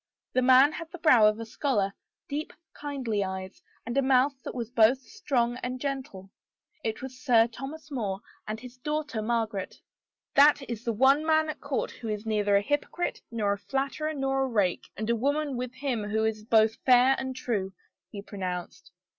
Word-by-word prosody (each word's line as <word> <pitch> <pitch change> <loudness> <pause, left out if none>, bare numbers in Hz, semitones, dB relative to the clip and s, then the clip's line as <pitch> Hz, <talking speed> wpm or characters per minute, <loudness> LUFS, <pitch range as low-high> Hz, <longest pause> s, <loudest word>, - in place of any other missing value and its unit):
The 255 - +3
man 260 +3 +6
had 325 +1 -7
the 355 - -7
brow 250 -10 +6
of 215 +1 +1
a 230 - -5
scholar, 220 -5 0 0.3
deep, 295 +2 -4 0.2
kindly 260 -8 -2
eyes, 190 0 -6 0.2
and 235 +2 -4
a 275 - +4
mouth 265 +1 +3
that - - -7
was 235 -2 -4
both 230 +2 +5
strong 250 - -1
and 255 0 -4
gentle. 255 -9 -5 0.5
It 220 +2 -3
was 260 -1 -8
Sir 235 -4 +5
Thomas 275 +6 -8
More 205 -8 -2 0.3
and 215 +1 -4
his 250 +1 -11
daughter 300 -4 -3
Margaret. 220 -3 -2 0.5
"That 285 -1 +5
is 235 -1 -5
the 235 - +1
one 270 +6 +4
man 315 0 +3
at - - -13
court 280 -2 -2
who 230 - -9
is 210 0 -3
neither 210 -2 +2
a - - +2
hypocrite 290 +7 -2
nor 215 -3 0
a 200 - -6
flatterer 275 +6 -2
nor 270 -1 0
a 265 - +1
rake, 205 -7 0
and 215 +1 -3
a 235 - +2
woman 285 +3 0
with 250 0 -4
him 255 -7 -2
who 220 +1 +1
is 215 -1 -2
both 220 0 +4
fair 255 +1 +5
and 260 -1 -4
true," 205 -7 -2 0.4
he 200 -1 -8
pronounced. 185 -2 -6
245 Hz, 190 wpm, -28 LUFS, 215-275 Hz, 0.5 s, man